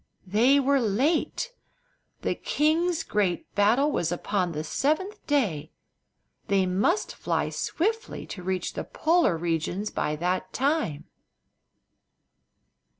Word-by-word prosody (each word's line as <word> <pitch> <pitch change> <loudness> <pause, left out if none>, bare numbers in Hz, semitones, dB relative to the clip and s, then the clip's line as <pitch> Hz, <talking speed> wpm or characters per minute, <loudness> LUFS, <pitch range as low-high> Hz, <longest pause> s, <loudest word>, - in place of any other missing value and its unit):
They 235 +9 +4
were 275 0 +3
late. 275 - 0 0.7
The - - +1
king's 325 +3 +1
great 195 -4 -1
battle 235 +9 +3
was 170 - 0
upon 180 0 -1
the 155 -1 -3
seventh 315 - -1
day, 215 - 0
and 60 +1 -44
they 195 -1 +3
must 200 - +1
fly - - -1
swiftly 445 +7 -2
to 180 - -8
reach 185 0 -2
the - - -4
Polar 325 - +2
regions 170 +5 -2
by 150 - -1
that 180 +3 -2
time. 270 - 0
210 Hz, 115 wpm, -26 LUFS, -, 0.7 s, They